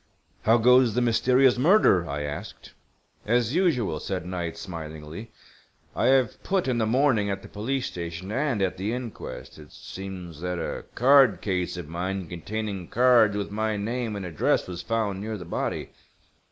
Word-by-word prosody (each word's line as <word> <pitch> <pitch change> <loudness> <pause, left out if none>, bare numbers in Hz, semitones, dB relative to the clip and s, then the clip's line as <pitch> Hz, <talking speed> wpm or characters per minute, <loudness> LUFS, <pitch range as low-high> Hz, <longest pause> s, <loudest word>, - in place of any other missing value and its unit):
"How 115 +2 +6
goes 125 -1 +5
the 125 - +2
mysterious 125 +2 +3
murder?" 130 - +4
I 75 +1 -3
asked. 75 0 -7 0.5
"As 120 +1 +2
usual," 125 - +1
said 90 +1 -4
Knight, 90 -2 -4
smilingly. 80 +3 -8 0.7
"I - - +1
have 130 -4 +2
put 190 -6 0
in 125 -2 0
the 110 - +1
morning 120 -4 +2
at 95 0 -3
the - - -10
police 125 +5 -2
station 85 +3 -6
and 130 -4 0
at 95 -1 -1
the 100 +5 -2
inquest. 120 -9 -7
It 75 -1 -14
seems 90 -5 -8
that 90 0 -2
a - - -4
card 135 -3 +5
case 90 -3 -2
of 85 -4 -6
mine 90 +3 -3
containing 95 +2 -5
cards 120 -4 +4
with 100 - -3
my 110 0 -1
name 115 +1 -3
and 100 -2 -5
address 85 -4 0
was 90 -1 -6
found 110 -4 -1
near 110 +1 -4
the 90 - -9
body. - - -3
105 Hz, 165 wpm, -26 LUFS, 90-125 Hz, 0.7 s, How